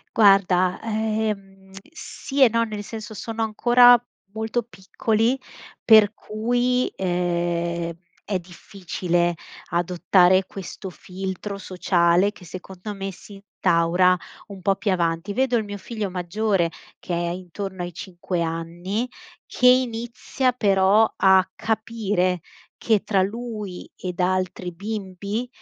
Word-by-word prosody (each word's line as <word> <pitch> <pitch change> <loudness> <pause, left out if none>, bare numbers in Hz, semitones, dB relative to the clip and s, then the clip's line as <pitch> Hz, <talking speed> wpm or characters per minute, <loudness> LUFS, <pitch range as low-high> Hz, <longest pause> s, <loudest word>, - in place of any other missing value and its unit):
Guarda, 190 -3 +4
ehm, 215 -3 -3 0.2
sì 285 -3 -1
e 255 - +7
no, 230 +1 +1
nel 215 -2 -5
senso 220 0 -8
sono 225 +2 -4
ancora 240 +3 +6 0.4
molto 220 +2 -1
piccoli, 225 +4 -1 0.5
per 215 -2 +7
cui, 245 +4 0
ehm, 170 -2 -1 0.3
è 200 - -1
difficile 175 -1 -2 0.3
adottare 180 +2 +3
questo 190 0 -8
filtro 190 +2 -6
sociale 180 0 +2
che 185 - -16
secondo 185 +3 -8
me 195 -1 -5
si 205 - -14
instaura 180 -2 +2 0.3
un 195 -2 -10
po' 195 +2 +2
più 205 +1 -1
avanti. 170 +1 0
Vedo 255 +2 +1
il 220 - 0
mio 205 0 -6
figlio 215 0 -4
maggiore 185 0 0 0.3
che 180 - -5
è 170 0 -1
intorno 185 +2 -6
ai 175 0 -6
5 175 0 -4
anni, 170 +7 -3 0.4
che 250 - +2
inizia 250 +1 +1
però 205 -1 +4
a 190 -1 +4
capire 215 -5 -1 0.4
che 220 -3 +1
tra 195 -3 +2
lui 210 -2 -5
ed 180 -1 -6
altri 185 0 -1
bimbi, 200 +3 -4
195 Hz, 120 wpm, -23 LUFS, 180-220 Hz, 0.5 s, e